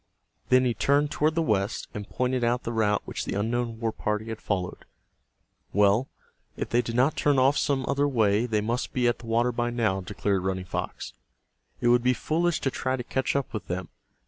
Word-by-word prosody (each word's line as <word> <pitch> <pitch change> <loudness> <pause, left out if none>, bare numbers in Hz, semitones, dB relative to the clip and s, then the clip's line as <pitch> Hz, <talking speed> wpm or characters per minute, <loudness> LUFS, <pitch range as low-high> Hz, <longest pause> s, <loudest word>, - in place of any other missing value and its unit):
Then 130 0 +5
he 120 - +2
turned 145 +4 +2
toward 155 +1 +1
the 165 - +2
west, 105 -5 0
and 105 -1 -6
pointed 125 0 0
out 120 +1 +1
the 115 - -3
route 105 -2 +1
which - - -4
the - - -3
unknown 115 +2 -1
war 115 -1 0
party 105 +1 -2
had 110 -1 -6
followed. 90 -3 -3 0.9
"Well, 105 +5 +3 0.5
if - - -3
they 120 - +3
did 115 -1 -5
not 135 +5 +3
turn 145 -2 +2
off 135 +2 +4
some 135 -3 0
other 140 +1 +2
way 110 -3 +2
they 110 -2 +1
must 115 +4 -2
be 125 -1 +2
at 120 - +1
the 120 - -11
water 120 +2 +2
by 120 0 -1
now," 110 -5 0
declared 100 0 -1
Running 95 0 -2
Fox. - - -5 0.7
"It 120 - +3
would 120 0 +5
be 125 +1 +3
foolish, 170 +3 0
to 135 - 0
try 130 +1 -1
to 125 - -4
catch 130 +2 -1
up 140 -1 -1
with 105 -5 -5
them. 90 +1 -4
120 Hz, 210 wpm, -27 LUFS, 105-130 Hz, 0.9 s, Then